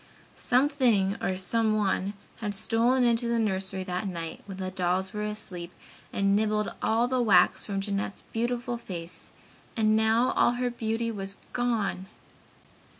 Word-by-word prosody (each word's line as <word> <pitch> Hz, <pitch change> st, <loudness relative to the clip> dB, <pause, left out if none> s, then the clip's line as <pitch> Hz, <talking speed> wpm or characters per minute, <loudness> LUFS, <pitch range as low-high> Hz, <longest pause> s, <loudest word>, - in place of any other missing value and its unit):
Something 245 Hz, -7 st, +2 dB
or 185 Hz, -, 0 dB
someone 210 Hz, -1 st, +1 dB, 0.2 s
had 210 Hz, -3 st, -3 dB
stolen 235 Hz, +5 st, +2 dB
into 235 Hz, 0 st, +2 dB
the 235 Hz, 0 st, +1 dB
nursery 190 Hz, -3 st, -1 dB
that 185 Hz, +2 st, -3 dB
night 170 Hz, -3 st, -5 dB
when 195 Hz, -2 st, -7 dB
the 185 Hz, -1 st, -3 dB
dolls 185 Hz, +1 st, 0 dB
were 210 Hz, -, -3 dB
asleep 195 Hz, -5 st, -4 dB, 0.4 s
and 200 Hz, 0 st, +2 dB
nibbled 210 Hz, 0 st, +1 dB
all 230 Hz, +2 st, +2 dB
the 255 Hz, 0 st, +1 dB
wax 200 Hz, -6 st, +4 dB
from 195 Hz, -2 st, -1 dB
Jeanette's 200 Hz, 0 st, -3 dB
beautiful 240 Hz, +1 st, -1 dB
face 175 Hz, -5 st, -7 dB, 0.5 s
and 215 Hz, -1 st, +4 dB
now 220 Hz, +3 st, +3 dB
all 240 Hz, -, +3 dB
her 245 Hz, 0 st, -1 dB
beauty 230 Hz, 0 st, -2 dB
was 195 Hz, -2 st, -5 dB, 0.2 s
gone! 225 Hz, -6 st, -1 dB
210 Hz, 145 wpm, -28 LUFS, 190-235 Hz, 0.5 s, wax